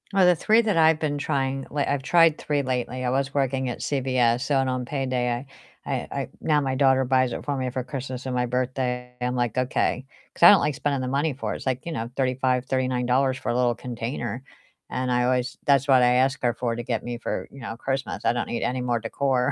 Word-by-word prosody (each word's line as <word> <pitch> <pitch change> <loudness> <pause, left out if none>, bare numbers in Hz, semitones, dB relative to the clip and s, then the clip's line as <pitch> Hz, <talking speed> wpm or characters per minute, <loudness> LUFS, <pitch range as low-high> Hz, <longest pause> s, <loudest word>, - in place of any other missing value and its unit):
Well, 190 -1 +5
the 180 0 +5
3 220 +8 +4
that 215 -4 0
I've 160 -1 +5
been 145 -2 -1
trying 135 -1 -1
like 145 -1 -1
I've 140 -1 -1
tried 165 +1 +4
3 145 -1 -1
lately. 130 0 -2
I - - +1
was 135 +2 -1
working 135 -2 0
at 120 - -5
CVS, 125 -3 +1
so 140 +1 0
and 135 -1 +1
on 125 -1 -2
payday 125 -2 -2 0.4
I - - -8
I - - -2
I - - -6
now 150 -2 +2
my 135 -2 -1
daughter 130 -1 +3
buys 130 -1 +2
it - - -6
for 145 - -1
me 130 -1 -2
for 130 0 -3
Christmas 130 0 -6
and 130 -1 -2
my 125 0 +1
birthday. 125 0 -2
I'm 125 0 -1
like, 120 -1 -1
"Okay," 130 0 0 0.3
'cause - - -3
I 175 - +12
don't 205 - +6
like 150 -1 0
spending 145 -2 -1
the 130 - -3
money 140 +4 0
for 130 - -4
it. - - -4
It's - - -11
like, 130 -1 -2
you 170 - -4
know, 115 -2 -4
35, 130 -1 +1
$39 130 0 +1
for - - -5
a 120 - 0
little 125 -1 +2
container, 120 0 -5 0.5
and 130 0 -2
I 125 0 +2
always 125 +3 0
that's 140 -1 +3
what 130 -2 +6
I 125 0 +4
ask 135 +1 +2
her 120 -1 +2
for 120 -1 -2
to 120 - -5
get 115 -2 -2
me 120 0 -4
for, 120 - -4
you 135 - -13
know, 115 -2 -6
Christmas. 135 +2 -3
I - - +3
don't 120 - -2
need 120 - -2
any 125 0 -1
more 120 -1 0
decor, 125 +2 0
130 Hz, 245 wpm, -25 LUFS, 125-140 Hz, 0.5 s, I